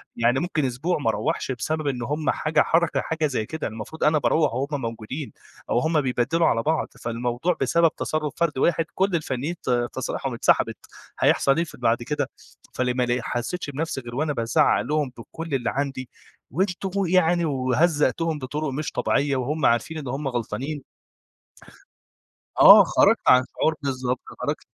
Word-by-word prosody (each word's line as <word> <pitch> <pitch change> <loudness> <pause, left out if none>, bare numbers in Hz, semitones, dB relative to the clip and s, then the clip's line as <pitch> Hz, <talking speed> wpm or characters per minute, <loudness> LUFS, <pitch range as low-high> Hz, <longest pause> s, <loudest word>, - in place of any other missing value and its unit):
يعني 120 +3 +2
ممكن 155 -4 -1
أسبوع 135 +8 -1
ما 115 - 0
أروّحش 110 +4 -1
بسبب 155 +4 -2
إن 125 -3 -2
هم 150 +4 -2
حاجة 155 +1 +2
حركة 165 0 +2
حاجة 160 -1 -1
زي 120 -6 -2
كده 160 +6 -4
المفروض 110 +8 -7
أنا 155 0 +4
باروّح 150 -3 +2
وهم 140 +2 -2
موجودين، 115 +5 -5 0.4
أو 120 - +2
هم 160 +1 +1
بيبدّلوا 130 +6 +1
على 115 0 +1
بعض 160 0 0 0.2
فالموضوع 120 +8 -1
بسبب 165 +5 +3
تصرُّف 155 -1 -2
فرد 170 -5 0
واحد 165 +3 +2
كل 190 -1 +1
الفنيّين 150 +1 -2
ت - - -4 0.2
تصاريحهم - - -3
اتسحبت - - +2 0.4
هيحصل 135 +3 +3
إيه 170 - +2
في 165 - -11
بعد 120 0 +1
كده؟ 145 0 -2 0.4
فلمّا 125 0 0
ل 120 0 -1
حسّيتش 145 +8 -3
بنفسي 145 -1 -3
غير 120 0 -9
وأنا 150 +1 0
بازعّق 130 +6 +2
لهم 150 -3 -1
بكل 160 +5 -5
اللي 120 -2 -1
عندي، 135 -2 -3 0.4
وأنتم 190 +3 -1
يعني 175 -1 +3
وهزّقتهم 150 +3 +1
بطرق 145 +3 -3
مش 150 +3 -3
طبيعية 140 -1 0
وهم 140 +4 -1
عارفين 120 +7 +1
إن 140 -4 -6
هم 135 +3 -3
غلطانين. 130 +4 -4 1.8
آه. - - +10
خرجت - - +4
عن 125 0 +6
شعور 160 - +1
بالضبط. 130 -2 -2 0.2
خرجت - - -3
145 Hz, 160 wpm, -24 LUFS, 125-160 Hz, 1.8 s, آه